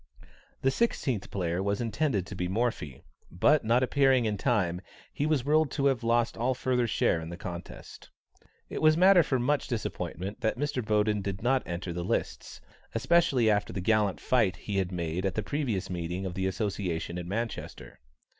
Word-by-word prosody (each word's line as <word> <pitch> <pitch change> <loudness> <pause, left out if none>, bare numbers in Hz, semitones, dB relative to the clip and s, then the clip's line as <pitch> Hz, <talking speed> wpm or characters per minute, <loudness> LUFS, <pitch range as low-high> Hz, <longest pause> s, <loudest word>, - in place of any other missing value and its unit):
The 135 - +4
sixteenth 130 - -1
player 90 -2 -2
was 100 +1 -1
intended 115 - 0
to - - -8
be 90 -1 -2
Morphy, 95 - -2 0.3
but 145 - +3
not 120 +3 +3
appearing 135 -2 +3
in 105 -1 0
time, 95 -6 0 0.3
he 145 - -1
was 150 -5 +1
ruled 155 0 +3
to 140 - 0
have 135 -4 +2
lost 115 0 +1
all 125 +3 0
further 125 -1 0
share 85 -6 +1
in 80 - -7
the 85 - -7
contest. 90 -2 -9 0.6
It - - -5
was 155 0 +5
matter 185 0 +7
for 135 -4 0
much 140 +4 0
disappointment 105 - -4
that 110 0 0
Mr. 145 -2 -2
Boden 105 -1 +1
did 95 +1 -4
not 130 +2 +3
enter 85 +1 -4
the 85 0 -3
lists, 90 - -3 0.3
especially 135 -2 +3
after 105 -1 +2
the - - -4
gallant 105 0 +1
fight 110 -7 +2
he 100 -1 -4
had 95 -1 0
made 85 0 -3
at 95 -1 -1
the 110 - -1
previous 120 -11 -2
meeting 90 +1 -4
of 90 - -4
the 95 +1 -1
association 95 -4 -2
in 85 - -6
Manchester. 115 +5 -5
110 Hz, 185 wpm, -29 LUFS, 95-130 Hz, 0.6 s, matter